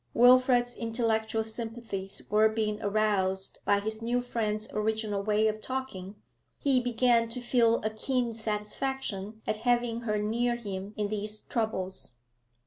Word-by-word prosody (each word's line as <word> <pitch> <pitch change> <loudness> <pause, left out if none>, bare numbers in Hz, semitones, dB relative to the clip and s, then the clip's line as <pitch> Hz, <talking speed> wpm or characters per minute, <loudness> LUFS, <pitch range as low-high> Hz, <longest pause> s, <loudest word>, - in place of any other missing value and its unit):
Wilfrid's 245 0 +5
intellectual 225 -1 0
sympathies 220 -3 -5
were 215 +1 +5
being 215 -1 -1
aroused 200 -2 0
by 205 0 +4
his 220 +2 -4
new 240 +2 +1
friend's 215 -3 -2
original 215 -1 0
way 215 +1 +2
of 215 0 -2
talking. 215 -8 -4 0.4
He 275 -3 +3
began 240 -1 +3
to 240 +2 -5
feel 240 -2 +3
a 215 - +1
keen 240 +1 -1
satisfaction 220 -1 -3
at 215 - 0
having 240 0 +1
her 215 -3 -1
near 235 +3 +1
him 200 -3 -6
in 210 -1 -1
these 210 0 -4
troubles. 190 - -3
220 Hz, 135 wpm, -29 LUFS, 210-240 Hz, 0.4 s, Wilfrid's